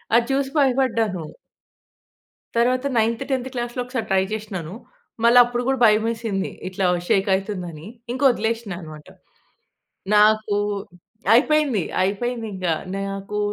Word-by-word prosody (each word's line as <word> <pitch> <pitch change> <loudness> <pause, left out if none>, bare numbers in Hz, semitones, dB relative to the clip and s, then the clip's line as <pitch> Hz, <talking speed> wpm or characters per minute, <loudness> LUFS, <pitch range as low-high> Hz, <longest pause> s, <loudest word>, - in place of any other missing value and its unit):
అది 235 0 +4
చూసి 270 0 0
భయపడ్డాను. 230 - +1 1.3
తరువాత 255 +3 +2
నైన్త్, 230 +3 +1
10థ్ 260 -1 -1
క్లాస్‌లో 240 0 -3
ఒకసారి 250 -2 -3
ట్రై 190 0 +3
జేశినాను. 195 -6 -5 0.5
మళ్ళ 235 +1 +5
అప్పుడు 240 0 -3
గూడా 270 -1 +1
భయమేసింది. 220 -2 +1 0.2
ఇట్లా 185 0 -2 0.2
షేక్ 195 0 +2
అయితుందని. 180 -5 -5 0.2
ఇంకా 260 +3 -3
వదిలేసినా 225 -4 -2
అనమాట. 155 -2 -11 1.1
నాకూ 215 0 +4 0.8
అయిపోయింది, 280 - +3 0.2
అయిపోయింది 225 +5 -2
ఇంగ. 185 -1 -4 0.3
నాకు 195 +1 -4
225 Hz, 110 wpm, -22 LUFS, 195-245 Hz, 1.3 s, మళ్ళ